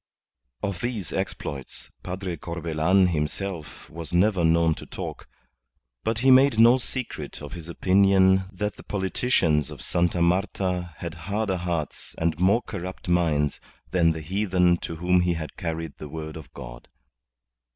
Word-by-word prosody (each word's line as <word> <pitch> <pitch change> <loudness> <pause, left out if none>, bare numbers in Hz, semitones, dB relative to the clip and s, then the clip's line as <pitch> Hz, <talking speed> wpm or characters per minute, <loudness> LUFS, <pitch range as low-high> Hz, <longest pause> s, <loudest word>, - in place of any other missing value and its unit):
Of 100 -4 -2
these 115 - -3
exploits 70 -2 -5
Padre 90 -1 -4
Corbelan 85 +3 +1
himself 80 +1 -4
was 85 0 -7
never 95 -1 +3
known 80 0 +4
to - - -10
talk. - - -7 0.8
But 110 0 0
he 135 - +8
made 130 -1 +6
no 120 +3 +7
secret 130 0 -5
of 75 - -8
his 85 -1 -8
opinion 95 +1 +4
that 105 +2 -3
the - - -12
politicians 95 - +1
of - - -9
Sta. 85 0 +1
Marta 90 -1 0
had 85 -2 -5 0.2
harder 100 -2 0
hearts 85 -4 -4
and 80 0 0
more 100 +6 +4
corrupt 95 -2 -6
minds 80 -5 +2 0.3
than 85 -3 +3
the 80 - -6
heathen 90 0 +2
to 85 - -6
whom 90 +2 +3
he 90 0 +2
had 80 -2 -6
carried 80 -3 -4
the 75 - -7
word 80 0 -6
of 80 -3 -10
God. - - -10
90 Hz, 150 wpm, -25 LUFS, 80-95 Hz, 0.8 s, he